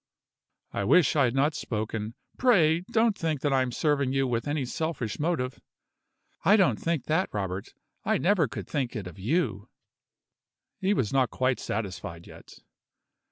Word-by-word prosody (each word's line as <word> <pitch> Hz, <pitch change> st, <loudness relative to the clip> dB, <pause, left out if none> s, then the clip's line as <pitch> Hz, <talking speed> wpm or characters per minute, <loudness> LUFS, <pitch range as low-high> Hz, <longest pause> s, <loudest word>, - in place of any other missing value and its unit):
"I 100 Hz, -, -2 dB
wish 160 Hz, -, +4 dB
I 140 Hz, -3 st, +5 dB
had 120 Hz, +1 st, -1 dB
not 145 Hz, +3 st, +3 dB
spoken. 110 Hz, -4 st, -4 dB, 0.2 s
Pray 170 Hz, -11 st, +4 dB
don't 225 Hz, -2 st, +3 dB
think 160 Hz, -6 st, -2 dB
that 145 Hz, -2 st, +1 dB
I 135 Hz, -, +4 dB
am 130 Hz, -1 st, -1 dB
serving 140 Hz, -1 st, +1 dB
you 135 Hz, 0 st, +2 dB
with 120 Hz, +1 st, -1 dB
any 145 Hz, -2 st, -1 dB
selfish 140 Hz, -4 st, -3 dB
motive." 135 Hz, -6 st, -1 dB, 0.8 s
"I 200 Hz, +5 st, +6 dB
don't 190 Hz, -4 st, +3 dB
think 165 Hz, -5 st, -1 dB
that, 160 Hz, +5 st, +1 dB
Robert. 95 Hz, -2 st, -4 dB, 0.3 s
I -, -, +2 dB
never 175 Hz, -4 st, +3 dB
could 110 Hz, -6 st, -7 dB
think 130 Hz, -4 st, -2 dB
it 105 Hz, -4 st, -4 dB
of 90 Hz, 0 st, -10 dB
you." 110 Hz, -, -1 dB, 1.1 s
He 195 Hz, +2 st, +2 dB
was 115 Hz, -, 0 dB
not 130 Hz, -3 st, +3 dB
quite 130 Hz, +2 st, 0 dB
satisfied 90 Hz, -6 st, -5 dB
yet. -, -, -14 dB
135 Hz, 160 wpm, -27 LUFS, 110-160 Hz, 1.1 s, I